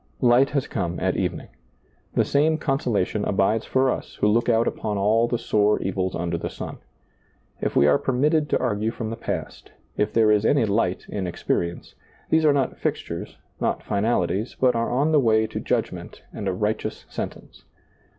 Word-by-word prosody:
Light 125 +2 +5
has 140 -3 -1
come 90 -5 -3
at 95 0 0
evening. 90 -3 -2 0.7
The - - +3
same 155 +3 +2
conso 135 -5 -1
lation 105 0 0
abides 105 +3 +1
for 130 0 +2
us - - -5
who - - -1
look 115 +3 +2
out 115 0 +3
upon 105 -2 -2
all 110 +4 +3
the 120 - 0
sore 105 -2 +2
evils 95 -1 -2
under 85 0 -2
the - - -4
sun. - - -7 0.8
If - - -2
we 70 - +5
are 75 -1 +4
permitted 150 +4 +1
to - - +2
argue 110 -3 0
from 115 -1 -5
the - - -3
past, 115 - -6 0.2
if 105 +1 +1
there 110 -2 +4
is 105 -1 +3
any 130 +1 +3
light 100 -3 0
in 95 -3 -3
experience, 85 0 -2 0.4
these 160 0 +4
are 150 - +6
not 140 -2 0
fixtures, - - -4 0.2
not - - -1
finalities, 105 0 0
but 130 -1 +4
are 115 0 0
on 140 +6 +1
the 155 - +5
way 110 -4 +3
to - - -5
judgment - - -3
and 100 - -5
a - - +2
righteous 105 +4 -2
sentence. - - -7
110 Hz, 185 wpm, -24 LUFS, 100-125 Hz, 0.8 s, are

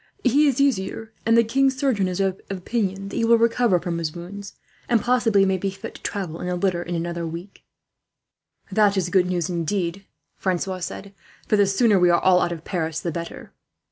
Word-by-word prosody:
"He 280 +4 +4
is 275 -1 +1
easier, 225 -4 0
and 230 0 +5
the 230 - +6
king's 265 +3 +1
surgeon 255 -9 +1
is 180 0 -3
of 195 -1 0
opinion 195 0 -2
that - - -6
he - - +1
will 230 0 +5
recover 230 -4 +3
from 170 -1 -3
his 160 -1 -3
wounds, 195 +4 -8 0.3
and 235 -2 +4
possibly 230 -5 +3
may 190 -1 +1
be 195 - -1
fit 195 0 -8
to - - -13
travel 180 -5 -4
in - - -4
a 180 - -1
litter, 180 -1 0
in 175 0 -4
another 170 0 -3
week." 170 +4 -9 1.1
"That 205 -2 +3
is 180 -2 0
good 180 -1 +3
news, 175 -3 -1
indeed," 180 +2 -2 0.3
Francois 185 0 -2
said; 195 +3 -6 0.3
"for - - +3
the 205 -1 +4
sooner 200 0 +3
we 180 0 +5
are 170 - +4
all 185 -1 +4
out 175 - 0
of 165 -2 -6
Paris, 160 -3 -2
the 170 - -3
better." 170 +1 -7
195 Hz, 205 wpm, -23 LUFS, 175-220 Hz, 1.1 s, the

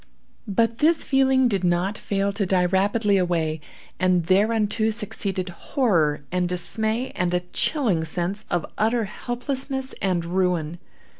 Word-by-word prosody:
But 230 +3 +1
this 315 +2 +3
feeling 265 -1 +3
did 200 -5 0
not 180 +3 +1
fail 200 -1 -1
to 200 +1 -1
die 180 -1 +2
rapidly 200 +3 +2
away, 165 -4 0 0.4
and 185 -2 +2
thereunto 215 +3 +2
succeeded 200 -4 -3
horror, 170 - 0
and 180 -1 0
dismay, 220 +7 -1
and 180 0 -1
a 180 - +1
chilling 225 - +1
sense 175 +6 -3
of 175 -2 0
utter 225 +2 +2
helplessness 265 +4 -3
and 180 -3 0
ruin. 175 -2 0
195 Hz, 135 wpm, -24 LUFS, 175-230 Hz, 0.4 s, this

